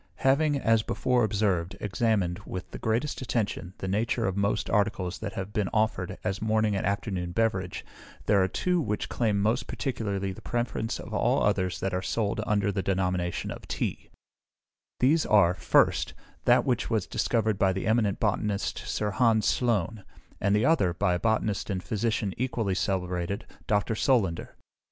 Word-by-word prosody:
Having, 145 +2 +4
as 115 -3 +3
before 125 +2 +1
observed, 95 -4 0
examined, 100 -4 0
with 95 -3 -7
the - - -7
greatest 120 +7 -1
attention, 100 -7 -2
the 95 - -5
nature 115 +4 0
of 95 - -1
most 100 0 0
articles 100 -4 0
that 100 -3 -5
have 95 +2 -5
been 105 -4 0
offered 110 -4 0
as 100 +2 -2
morning 110 -1 +1
and 95 - -1
afternoon 95 -3 -2
beverage, 95 -4 -1 0.4
there 100 -2 +4
are 95 - +3
two 180 - 0
which 105 -7 -2
claim 110 -4 +1
most 110 +5 +1
particularly 100 -8 -2
the 95 - -10
preference 120 -2 -2
of - - -8
all - - +2
others 95 -1 +1
that 95 - -1
are 90 - 0
sold 110 +1 -1
under 100 -1 +2
the 95 - -1
denomination 90 -2 -1
of - - -9
Tea: - - -3 0.9
these 150 +6 +4
are, 100 -5 +4
1st, - - +2 0.3
that - - +5
which 120 -2 0
was 110 -5 0
discovered 110 -4 0
by 95 -1 +4
that 95 0 -3
eminent 110 -3 +2
botanist 105 -1 -1
Sir 105 -1 -2
Hans 110 +1 +3
Sloane; 110 -3 0 0.4
and 100 +1 +2
the 105 +4 +2
other, 100 - +3
by 90 0 +1
a 90 - 0
botanist 110 -1 0
and 95 -2 -2
physician 110 -2 -1
equally 115 -5 -1
celebrated, 90 0 -2 0.2
Dr. 105 +1 +1
Solander. 105 -7 +1
105 Hz, 165 wpm, -28 LUFS, 95-115 Hz, 0.9 s, that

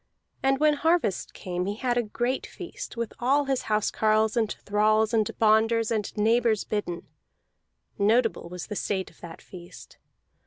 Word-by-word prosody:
And 270 0 +2
when 305 0 +4
harvest 320 - +1
came 180 0 -3
he 205 - -2
had 245 +2 -1
a 245 - +3
great 240 +4 -2
feast, - - -8
with 235 -2 -3
all 275 +4 +2
his 270 -2 0
house 210 -1 +1
carles 215 +1 +2
and 225 -3 +1
thralls 215 +2 +2
and 220 -3 +2
bonders 225 +1 +3
and 215 -3 -1
neighbors 225 0 +2
bidden; 180 -5 -4 0.9
notable 220 -3 +2
was 180 0 -6
the 210 - -6
state 190 -1 -2
of - - -25
that 170 -2 -10
feast. 175 -1 -13
220 Hz, 160 wpm, -26 LUFS, 205-240 Hz, 0.9 s, when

